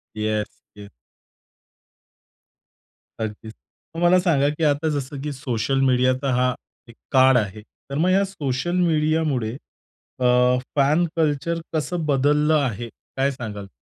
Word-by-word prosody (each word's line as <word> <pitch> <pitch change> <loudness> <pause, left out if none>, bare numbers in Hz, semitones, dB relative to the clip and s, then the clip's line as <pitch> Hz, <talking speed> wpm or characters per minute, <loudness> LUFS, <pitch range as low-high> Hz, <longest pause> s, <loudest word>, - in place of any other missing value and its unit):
Yes, 105 -1 -3
yes. 100 -1 -12 2.3
अगदीच. 110 0 -6 0.4
मग 165 - -4
मला 175 +1 +5
सांगा, 145 -6 +2
की 150 +2 -4
आता 150 +1 +2
जसं 135 0 -5
की 150 +1 -4
सोशल 130 -1 -1
मीडिया 130 -1 +3
तर 140 - -1
हा 125 0 +2 0.4
एक 115 - -14 0.2
काळ 130 -1 +6
आहे, 105 -1 -2 0.3
तर 140 - -3
मग 175 +4 +2
या 195 +1 +4
सोशल 165 -3 -3
मीडियामुळे 150 -7 0 0.6
अ, 125 0 +3 0.2
फॅन 150 +5 +3
कल्चर 160 +1 0 0.2
कसं 160 +1 -2
बदललं 150 +2 +2
आहे? 120 -4 -3 0.3
काय 135 +1 +2
सांगाल? 105 -6 -7
135 Hz, 130 wpm, -22 LUFS, 125-155 Hz, 2.3 s, काळ